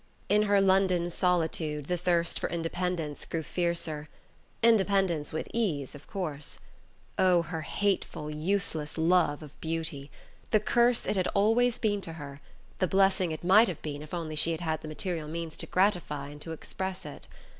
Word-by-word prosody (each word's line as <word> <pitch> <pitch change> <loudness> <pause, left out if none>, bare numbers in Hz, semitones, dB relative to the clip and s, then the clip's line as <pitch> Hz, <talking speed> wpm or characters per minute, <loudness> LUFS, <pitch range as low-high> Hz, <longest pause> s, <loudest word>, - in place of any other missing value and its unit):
In 210 +1 +5
her 200 -1 +5
London 190 -3 +3
solitude 160 -4 0
the 180 - 0
thirst 170 -1 +1
for - - -2
independence 165 -2 -2
grew 165 -1 -3
fiercer. 170 -3 -2 0.5
Independence 195 -8 +3
with 155 - -3
ease, 165 - -1
of 145 -1 -12
course. 155 -7 -4 0.6
Oh, 180 -2 +5
her 160 0 -4
hateful 195 -3 -1
useless 160 -1 -1
love 165 -2 +3
of 150 -1 -14
beauty... 160 -3 -3 0.4
the 215 - +4
curse 240 +3 +3
it 210 - 0
had 185 - +1
always 225 +4 +3
been 205 -4 0
to 165 - -6
her, 145 -3 -9 0.4
the 185 - +2
blessing 190 -2 +3
it 155 - -5
might 200 +6 +6
have 180 -5 -5
been 145 -1 -4
if 150 - -10
only 165 -3 -4
she 165 +2 +1
had 160 - -5
had 160 -2 -1
the - - -8
material 160 0 -3
means 165 0 -4
to - - -3
gratify 175 -7 +1
and 145 0 -11
to 165 - -7
express 190 +3 -5
it! - - -9
170 Hz, 170 wpm, -29 LUFS, 155-190 Hz, 0.6 s, might